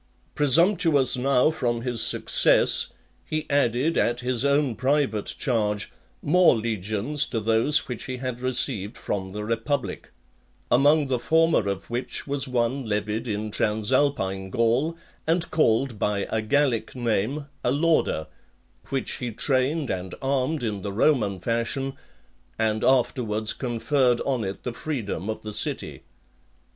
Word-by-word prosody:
Presumptuous 150 -2 +4
now 130 +3 +3
from 120 -6 -1
his 120 -3 -1
success, - - +3 0.4
he 155 0 -3
added, 140 +3 +2
at 120 +1 0
his 125 0 0
own 140 -3 +2
private 130 -5 0
charge, 105 -5 -1 0.3
more 180 0 +5
legions 110 +6 -1
to 115 - -2
those 115 +7 +2
which 125 -3 -5
he 130 -1 -5
had 125 -1 -4
received 125 -4 0
from 95 -2 -3
the 105 +2 -6
republic; 115 +5 -2 0.6
among 145 +4 +4
the 130 -2 -1
former 160 -7 +2
of 100 +3 -5
which 120 +2 -3
was 140 -1 -1
one 125 +2 0
levied 105 +1 -2
in 105 0 -3
Transalpine 105 -3 0
Gaul, 120 - +1 0.3
and 165 +1 +1
called 120 -5 +1
by 105 -2 0
a 110 - 0
Gallic 120 -1 0
name, 120 +4 -1 0.2
Alauda, 145 - +1 0.6
which 135 -1 -2
he 125 -4 -4
trained 135 +5 0
and 95 -1 -4
armed 135 +2 -1
in 105 -4 -3
the 100 - -4
Roman 105 -4 +1
fashion, 115 +6 -2 0.6
and 110 -1 0
afterwards 115 -4 +1
conferred 125 0 +1
on 130 -5 -1
it 95 0 -5
the 125 - -4
freedom 115 - -4
of 110 - -4
the 105 0 -6
city. - - -3
125 Hz, 135 wpm, -25 LUFS, 110-140 Hz, 0.6 s, more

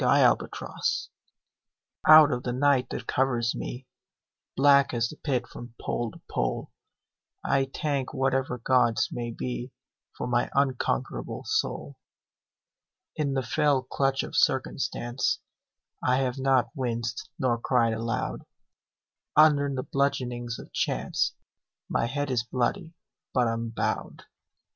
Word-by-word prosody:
Y - - +5
Z - - +6
Invictus 465 0 -3 1.0
OUT 155 -1 +9
of 125 -1 -1
the 125 - -3
night 135 0 +2
that - - -5
covers 120 -3 +1
me, 125 +1 -6 0.7
Black 140 -2 +5
as 115 0 +1
the - - -9
Pit 130 -6 -1
from 120 -1 -11
pole 120 -1 -2
to - - -14
pole, - - -2 0.7
I 135 -1 +2
thank 140 -4 -2
whatever 135 -2 0
gods 120 -2 +2
may 120 -1 -4
be 125 +2 -4 0.5
For - - -3
my 120 0 +1
unconquerable 135 -2 -1
soul. - - -2 1.2
In 140 -3 -1
the 135 - 0
fell 140 +2 +2
clutch 135 +1 0
of - - -7
circumstance 130 -4 0 0.6
I 125 - +2
have 130 -1 -1
not 135 -2 +2
winced 120 -4 -3
nor 120 -3 +1
cried 115 -2 +2
aloud, 115 +1 -3 0.9
Under 150 -2 +5
the 130 -1 -2
bludgeonings 125 -4 -1
of - - -12
chance - - 0 0.5
My 115 - 0
head 145 +2 -2
is 125 -3 +2
bloody, 125 +7 -2 0.4
but 125 -2 +3
unbowed. 115 0 -2
130 Hz, 125 wpm, -27 LUFS, 120-140 Hz, 1.2 s, OUT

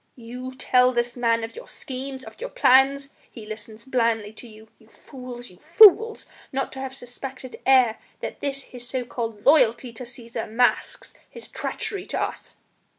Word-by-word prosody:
You 250 +2 -7
tell 250 -1 +3
this 240 0 -1
man 230 -2 +1
of 225 - -6
your 485 - -10
schemes, 265 0 -7
of - - -13
your - - -4
plans! 275 - +4 0.2
He 225 -3 -11
listens 220 +1 -9
blandly 230 -5 0
to 240 - -11
you!... 220 0 -15
You 220 - -22
fools! 245 -1 -10
you 180 - -18
fools! 435 - +6 0.3
Not 270 0 -2
to 265 - -8
have 265 0 -5
suspected 255 +1 -8
ere 255 -4 +5 0.2
this 275 -1 -4
that - - -21
his 245 -1 -8
so 255 -2 -2
called 225 -3 -5
loyalty 245 -4 +4
to 240 - -8
Cæsar 235 -2 -6
masks 245 +2 0 0.2
his 470 - -10
treachery 425 -5 -5
to - - -3
us!" - - -5
250 Hz, 170 wpm, -24 LUFS, 230-270 Hz, 0.3 s, fools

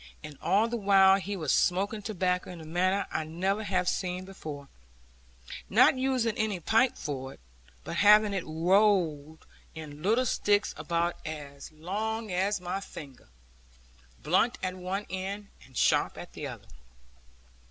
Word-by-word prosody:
And 150 -1 -8
all 210 +4 +3
the 235 0 -3
while 195 -2 +5
he 200 +1 -4
was 155 -6 -1
smoking 200 +4 +1
tobacco 185 -3 -1
in 180 -2 -8
a 160 - -10
manner 185 +5 +1
I 155 - -1
never 185 +6 -1
had 185 -4 -1
seen 180 0 -2
before, 155 -7 -8 1.0
not 245 +6 +6
using 255 -4 0
any 210 -4 0
pipe 225 +9 +2
for 135 -2 -5
it, - - -26 0.4
but - - -5
having 210 0 +6
it 190 -3 -2
rolled 165 -3 +1 0.3
in 150 -2 -9
little 225 +8 +2
sticks 205 -3 +1
about 170 +2 -1
as 145 -3 -8
long 210 +7 -4
as 190 +3 0
my 180 +2 -3
finger, 135 - -11 0.9
blunt 185 - +2
at 185 -1 -1
one 185 +3 -4
end 195 +2 -5 0.2
and 130 - -12
sharp - - +2
at - - -9
the - - -5
other. - - -10
185 Hz, 150 wpm, -29 LUFS, 160-205 Hz, 1.0 s, not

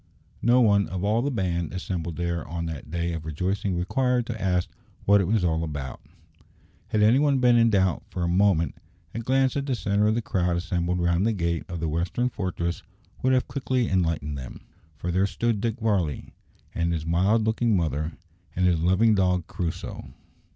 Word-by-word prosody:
No 120 +2 +4
one 100 -3 +4
of 95 0 -4
all 110 +3 +2
the 140 - 0
band 90 - -2
assembled 85 -3 -4
there 85 -1 -2
on 85 -1 -4
that 80 -3 -6
day 85 +1 -2
of 80 -1 -5
rejoicing 90 +4 -2
required 125 +6 +1
to 110 -3 -5
ask 90 -2 +1 0.4
what 100 0 +5
it 90 - -1
was 105 -1 +1
all 80 -1 +1
about. 75 -5 -5 0.9
Had 105 -1 +1
any 115 +5 +5
one 145 -2 +3
been 125 -2 +4
in 115 -1 +5
doubt 95 -5 +2
for 90 - -3
a - - +1
moment, 85 -4 +2 0.4
a - - -3
glance 130 +3 +1
at 140 0 -2
the 130 - +1
centre 105 -2 +1
of 110 - +2
the 120 - 0
crowd 90 -5 0
assembled 90 0 -1
round 85 +1 +2
the 115 - +2
gate 85 -4 -1
of 85 -1 -4
the 80 - -2
western 85 +10 -1
fortress 85 -5 -3 0.4
would 130 0 +3
have 130 - +2
quickly 130 -3 -1
enlightened 80 -6 0
him. 65 - -9 0.4
For 90 +2 -3
there 95 +3 +2
stood 115 0 -1
Dick 115 +1 -2
Varley, 95 - -1 0.4
and 85 0 0
his 80 -2 -2
mild 95 +7 +2
looking 110 -1 +2
mother, 80 -1 -1 0.4
and 90 - +1
his 90 -3 +3
loving 95 +7 +3
dog 90 -3 +2
Crusoe. 85 0 -5
90 Hz, 195 wpm, -25 LUFS, 85-110 Hz, 0.9 s, what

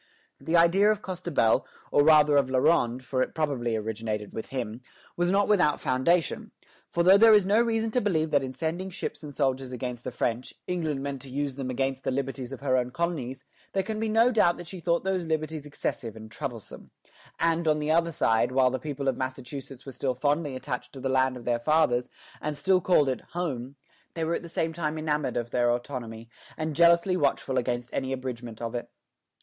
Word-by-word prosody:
The 165 +1 +1
idea 180 +5 +5
of 215 -1 0
Costebelle, 175 -11 +1 0.3
or 145 - +5
rather 150 -1 +6
of 140 -2 +3
La 130 - +1
Ronde, 130 -3 +2
for 130 +1 -1
it - - -2
probably 135 -7 -1
originated 110 -1 -4
with 110 - -5
him, 120 -3 -4 0.3
was 175 0 +1
not 200 +2 +3
without 185 -8 +3
foundation; 150 +5 +1 0.4
for 170 - +1
though 190 +3 +7
there 225 0 +8
is 205 -3 +4
no 210 +4 +4
reason 225 -1 0
to 250 - +1
believe 160 -6 0
that 145 - +4
in 130 -1 -4
sending 165 +7 -3
ships 190 - -5
and 150 -2 -8
soldiers 135 -2 -1
against 125 -1 -5
the - - -3
French, 120 +1 -2
England 155 -6 -2
meant 140 -2 -4
to 135 - -10
use 140 0 -2
them 135 -2 -4
against 135 +1 -2
the - - -1
liberties 135 -1 -3
of 135 - -7
her 130 -2 +2
own 125 -1 0
colonies, 135 -4 -3 0.3
there 195 - +1
can 215 +2 -4
be 220 0 -1
no 225 +3 +4
doubt 180 -7 +3
that 175 - -8
she 185 +2 -8
thought 170 0 0
those 185 -3 -1
liberties 155 -1 -2
excessive 115 -5 -4
and 110 0 -11
troublesome; 115 -3 -7 0.5
and, 165 0 +1
on 155 -1 +4
the 150 0 -1
other 170 +1 +3
side, 115 -5 +2
while 130 -1 +3
the 130 - -2
people 145 -2 -4
of 135 - +2
Massachusetts 130 0 -6
were 135 - -7
still 130 -1 -2
fondly 145 +1 0
attached 130 -1 -5
to 135 - -9
the 135 - -2
land 130 -1 +2
of 120 - -11
their 120 -1 +1
fathers, 125 -2 +2 0.3
and 150 -1 -3
still 185 +5 +3
called 160 -5 +4
it 130 -3 -1
"Home," 140 -7 -3 0.4
they 165 - -2
were 165 +1 0
at - - -1
the 170 - -10
same 165 0 -1
time 155 -1 -2
enamoured 150 -4 -1
of 120 0 -3
their 120 -1 +2
autonomy, 120 -2 -5 0.3
and 155 -1 -3
jealously 170 +3 +5
watchful 140 -4 +1
against 120 0 -3
any 130 - -2
abridgment 120 -3 -5
of 115 - -3
it. 120 - -4
140 Hz, 210 wpm, -27 LUFS, 125-170 Hz, 0.5 s, there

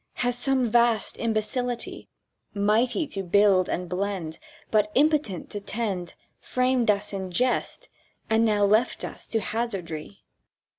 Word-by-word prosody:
"Has 245 0 +1
some 260 -1 +2
Vast 235 -2 +2
Imbecility, 235 +2 -2 0.5
Mighty 220 - +2
to 195 - -4
build 195 0 +3
and 180 0 -2
blend, 180 -3 -3 0.3
But 210 -1 +2
impotent 290 - +1
to 205 - -4
tend, 200 -4 -3 0.2
Framed 255 -2 +1
us 205 0 +1
in 190 -1 -4
jest, 255 - -1 0.4
and 225 +1 +3
left 210 +3 +2
us - - -9
now - - -9
to 225 -2 0
hazardry? 195 -6 -4
215 Hz, 130 wpm, -26 LUFS, 195-240 Hz, 0.5 s, build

